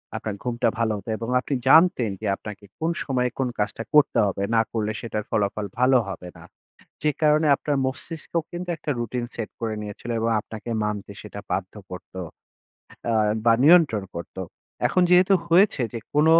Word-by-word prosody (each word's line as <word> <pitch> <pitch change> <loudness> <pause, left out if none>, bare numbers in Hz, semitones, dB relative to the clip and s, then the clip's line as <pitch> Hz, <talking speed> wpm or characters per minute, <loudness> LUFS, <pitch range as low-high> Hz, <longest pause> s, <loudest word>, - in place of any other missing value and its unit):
আপনার 105 -2 -4
ঘুমটা 120 0 0
ভালো 115 -1 +1
হতো 100 - -9
এবং 115 +1 -5
আপনি 135 +2 -2
জানতেন 160 - +6
যে 110 - -2
আপনাকে 105 -1 -9
কোন 160 - 0
সময়ে 125 -2 0
কোন 130 - +1
কাজটা 105 +2 -1
করতে 150 -1 +5
হবে, 100 0 -2
না 115 - +5
করলে 110 -2 -1
সেটার 105 -2 -3
ফলাফল 105 0 0
ভালো 130 +1 +5
হবে 90 -1 -7
না। - - -13 0.6
যে 150 - +3
কারণে 155 0 +4
আপনার 145 +1 -2
মস্তিষ্কও 160 +5 -2
কিন্তু 175 +1 -5
একটা 150 - -3
routine 120 +1 -3
set 115 -2 -4
করে 110 -1 -2
নিয়েছিল, 105 +3 -8
এবং 115 +1 0
আপনাকে 110 +2 -9
মানতে 105 -1 -3
সেটা 105 -1 -8
বাধ্য 95 0 -2 0.2
করত, 90 0 -10 0.9
অ্যা 115 -1 +2 0.3
বা 115 - +6
নিয়ন্ত্রণ 150 - +5
করত। 85 +2 -8 0.5
এখন 185 - +2
যেহেতু 185 +2 +6
হয়েছে 170 -5 +4
যে 115 - -4 0.2
কোন 150 +1 +4
120 Hz, 170 wpm, -24 LUFS, 105-150 Hz, 0.9 s, জানতেন